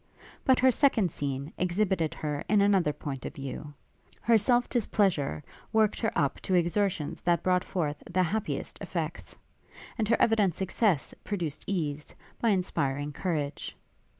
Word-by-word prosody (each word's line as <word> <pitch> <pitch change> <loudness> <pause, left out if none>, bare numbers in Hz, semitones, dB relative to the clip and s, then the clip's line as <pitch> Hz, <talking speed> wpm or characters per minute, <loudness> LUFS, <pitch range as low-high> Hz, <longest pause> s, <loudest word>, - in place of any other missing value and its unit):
But 260 -1 +4
her 260 0 +6
second 230 - +3
scene 140 +1 -4
exhibited 180 -2 +1
her 150 -1 -3
in 210 - +4
another 195 -6 +4
point 140 -3 -6
of - - -6
view; 140 +1 -6 0.5
her 235 - +4
self 240 +3 +3
displeasure 190 - +1 0.3
worked 220 -1 +3
her 225 - 0
up 140 -1 0
to 185 - 0
exertions 175 -2 0
that 170 -2 +1
brought 180 -1 +2
forth 150 -6 -2
the 185 +1 +2
happiest 210 +5 -3
effects; - - -4 0.6
and 215 - +1
her 230 - +3
evident 210 -7 +3
success 190 - 0
produced 170 -8 -3
ease, 150 -6 -3 0.3
by 230 - +3
inspiring 145 -7 0
courage. 150 -4 -3
180 Hz, 145 wpm, -29 LUFS, 150-210 Hz, 0.6 s, her